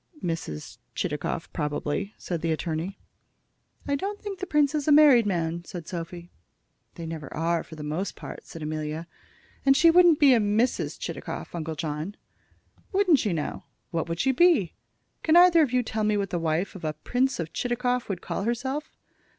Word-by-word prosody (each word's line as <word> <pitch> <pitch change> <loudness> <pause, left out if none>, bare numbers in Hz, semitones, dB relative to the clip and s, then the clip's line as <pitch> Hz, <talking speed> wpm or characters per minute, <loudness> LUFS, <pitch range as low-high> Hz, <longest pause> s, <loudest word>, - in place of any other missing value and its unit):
"Mrs. 165 - -4 0.2
Chitakov, - - -3
probably," 150 +6 -2
said 170 -3 -4
the 165 - 0
attorney. 165 +4 -3 0.9
"I 285 - 0
don't 400 +8 -2
think 400 -2 -6
the 380 - -4
prince 295 -3 +3
is 300 -1 -1
a - - +5
married 285 -7 +7
man," 170 -2 -1
said 175 -2 -8
Sophy. 175 0 -6 0.6
"They 170 - -6
never 160 -3 -6
are, 165 +1 +1
for 160 - -12
the 150 - -7
most 155 +7 -3
part," - - -9
said 165 - -8
Amelia; 155 +1 -3 0.6
"and 270 0 +5
she 335 +2 +7
wouldn't 345 -2 +6
be 285 - +7
Mrs. 225 +1 +2
Chitakov, - - -6
Uncle 160 -2 -4
John." 155 +5 -4 0.8
"Wouldn't 380 -7 +4
she, 210 - 0
now? 160 -3 -3 0.3
What 165 0 -2
would 165 +1 -3
she 265 - +3
be? 275 - +4 0.5
Can 320 +1 +4
either 350 -2 +7
of 285 -6 +2
you 250 -1 +2
tell 220 -1 -2
me 210 0 +2
what 200 -1 -2
the 175 - 0
wife 165 +3 -1
of 190 - -10
a 155 -1 -1
Prince 250 - 0
of 165 0 -4
Chitakov 245 0 -1
would 185 -3 -3
call - - -3
herself?" 260 +7 -3
195 Hz, 180 wpm, -26 LUFS, 165-270 Hz, 0.9 s, married